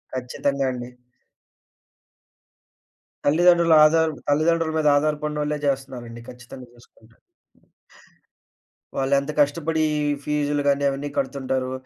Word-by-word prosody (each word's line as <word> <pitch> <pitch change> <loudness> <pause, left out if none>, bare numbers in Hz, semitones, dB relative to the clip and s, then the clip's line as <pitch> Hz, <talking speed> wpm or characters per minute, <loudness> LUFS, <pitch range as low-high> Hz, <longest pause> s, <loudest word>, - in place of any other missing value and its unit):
ఖచ్చితంగా 135 +2 -2
అండి. 125 0 -7 2.4
తల్లిదండ్రుల 170 +2 +4
ఆధార్ 160 +1 +3 0.2
తల్లిదండ్రుల 160 +2 +1
మీద 155 -1 +1
ఆధారపడినోల్లే 150 0 -2
చేస్తున్నారండి 125 -4 -4
ఖచ్చితంగా 125 0 -12
చూసుకుంటే. 115 -1 -23 1.8
వాళ్ళంత 140 +2 0
కష్టపడీ 155 +2 +1 0.4
ఫీజులు 145 -1 -1
గాని, 140 0 +2
అవన్నీ 140 +1 -4
కడుతుంటారు. 130 -1 -2
145 Hz, 80 wpm, -23 LUFS, 130-150 Hz, 2.4 s, తల్లిదండ్రుల